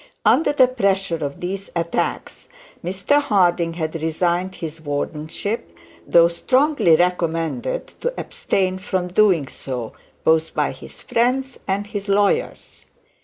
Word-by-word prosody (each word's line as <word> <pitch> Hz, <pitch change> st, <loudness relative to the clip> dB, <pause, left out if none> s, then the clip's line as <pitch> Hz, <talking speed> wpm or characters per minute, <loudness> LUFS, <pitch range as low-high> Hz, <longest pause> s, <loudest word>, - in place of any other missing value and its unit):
Under 320 Hz, -, +4 dB
the 265 Hz, -3 st, +5 dB
pressure 195 Hz, -9 st, 0 dB
of 140 Hz, -1 st, -5 dB
these 195 Hz, +2 st, -4 dB
attacks, 170 Hz, 0 st, -2 dB, 0.4 s
Mr 195 Hz, +11 st, +1 dB
Harding 175 Hz, -8 st, +2 dB
had 160 Hz, -1 st, -3 dB
resigned 175 Hz, +3 st, 0 dB
his 160 Hz, -1 st, -7 dB
wardenship, 155 Hz, +8 st, -4 dB, 0.3 s
though 170 Hz, -1 st, +6 dB
strongly 255 Hz, -, +3 dB
recommended 175 Hz, -, 0 dB, 0.2 s
to -, -, 0 dB
abstain 185 Hz, -1 st, -1 dB
from 185 Hz, -1 st, -2 dB
doing 180 Hz, -7 st, +3 dB
so, 125 Hz, -5 st, -6 dB, 0.3 s
both 160 Hz, 0 st, +2 dB
by -, -, +1 dB
his -, -, -12 dB
friends 255 Hz, +3 st, 0 dB
and 200 Hz, +1 st, -1 dB
his 205 Hz, 0 st, -6 dB
lawyers. 205 Hz, -, 0 dB
180 Hz, 120 wpm, -21 LUFS, 165-205 Hz, 0.4 s, though